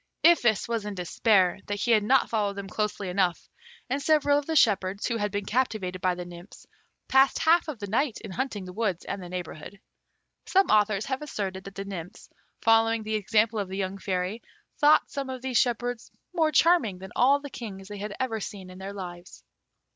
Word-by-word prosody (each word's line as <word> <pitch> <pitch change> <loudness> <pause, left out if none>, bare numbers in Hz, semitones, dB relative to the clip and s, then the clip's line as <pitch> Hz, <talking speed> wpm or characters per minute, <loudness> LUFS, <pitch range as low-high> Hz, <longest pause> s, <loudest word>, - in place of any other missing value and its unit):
Iphis 240 - +4
was 230 -2 -2
in 210 -1 -5
despair 185 +1 +2
that 205 0 -3
he 240 - +1
had 220 -2 +5
not 255 +5 +3
followed 205 -3 -1
them 200 -1 -6
closely 210 0 -2
enough, 180 -1 0 0.4
and 275 +3 -1
several 290 -1 +3
of 290 - -9
the 320 - -1
shepherds, 200 -6 +2
who 235 - 0
had 210 -1 -1
been 205 0 -3
captivated 210 -6 -1
by 185 -1 +1
the 180 0 -6
nymphs, 175 +2 -12 0.4
passed 270 +1 +4
half 335 +2 +3
of 305 -5 -5
the 205 - -5
night 230 +4 0
in 210 - -8
hunting 215 -4 -3
the 180 - -9
woods 195 -4 -2
and 195 - -4
the 180 - -8
neighbourhood. 180 +1 -7 0.7
Some 385 +1 +3
authors 210 -1 +3
have 265 +1 -3
asserted 195 -10 -4
that 195 0 -10
the 195 - -5
nymphs, 190 0 -8 0.3
following 225 0 +4
the 215 0 -4
example 215 +1 +2
of 200 - -2
the 190 +1 -6
young 195 0 -3
Fairy, 190 +3 -2 0.4
thought 300 0 +5
some 275 -2 -4
of 260 -1 -6
these 260 -2 +2
shepherds 245 -1 -1 0.2
more 320 -3 +2
charming 310 - +3
than 190 0 -10
all 275 +3 +4
the 285 -1 -9
kings 195 -5 -8
they 205 -1 -8
had 205 0 -5
ever 230 -4 -1
seen 195 -2 -7
in 185 - -12
their 195 +1 -6
lives. 175 -2 -9
210 Hz, 205 wpm, -27 LUFS, 190-245 Hz, 0.7 s, had